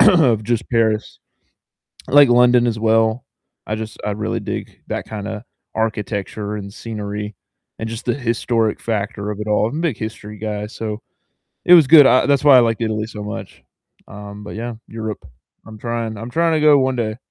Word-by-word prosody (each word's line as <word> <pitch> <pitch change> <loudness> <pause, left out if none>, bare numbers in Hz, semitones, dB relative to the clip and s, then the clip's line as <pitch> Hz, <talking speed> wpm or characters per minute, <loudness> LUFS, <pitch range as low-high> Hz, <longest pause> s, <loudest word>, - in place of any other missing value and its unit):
of 150 - +5
just 115 0 -1
Paris. 110 -2 0 0.9
I - - -8
like 145 -2 +8
London 120 0 +5
as 115 -2 -1
well. 110 +2 +2 0.4
I 105 - -2
just 110 0 -7
I 105 - -1
really 105 +2 -3
dig - - -6
that - - -4
kinda 110 +1 -6 0.3
architecture 105 -1 -3
and 100 -1 -7
scenery, 105 -2 -6 0.4
and 110 - -4
just 115 +1 -6
the 120 - +2
historic 115 -3 0
factor 105 -1 -3
of 105 0 -6
it 105 - -4
all. 105 0 +2
I'm 150 - -4
a - - -2
big 165 -9 -1
history 105 -1 -7
guy, 105 0 -4
so 110 0 -5 0.6
it 180 - +8
was 160 -5 +7
good. 145 -1 +8
I 130 - +4
that's 140 -1 +2
why 140 -3 +8
I - - +8
liked 115 -1 +1
Italy 110 -1 -1
so 105 -2 -8
much, 105 - -7 0.5
um, 105 0 -9
but - - -8
yeah, 115 0 -5
Europe, 110 -2 -6 0.4
I'm 110 -1 -11
trying 115 -1 -3
I'm 115 +3 -7
trying 165 +4 +2
to 155 - +1
go 150 -1 +6
one 130 -1 +1
day. 110 -2 -2
110 Hz, 190 wpm, -19 LUFS, 105-120 Hz, 0.9 s, like